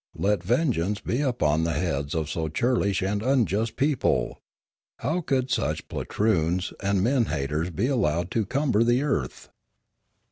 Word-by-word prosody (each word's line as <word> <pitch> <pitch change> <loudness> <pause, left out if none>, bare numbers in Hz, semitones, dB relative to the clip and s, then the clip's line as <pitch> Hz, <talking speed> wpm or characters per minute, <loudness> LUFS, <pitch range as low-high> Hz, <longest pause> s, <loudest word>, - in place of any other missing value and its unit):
Let 100 -1 +1
vengeance 105 - 0
be 125 - -1
upon 80 - +1
the 85 0 0
heads 70 -4 -2
of 80 -2 -1
so 80 0 -2
churlish 100 0 +1
and 100 +2 -1
unjust 115 -3 +1
a - - -38
people! 140 -1 0 0.6
How 160 +8 -1
could 135 -4 -1
such 75 +2 -1
poltroons 90 -4 0
and 100 -1 +1
men 125 +1 +2
haters 75 +2 -2
be 95 +6 -1
allowed 85 - 0
to 110 -4 0
cumber 130 -5 +2
the 120 +3 +2
earth 80 - -2
100 Hz, 150 wpm, -26 LUFS, 80-125 Hz, 0.6 s, men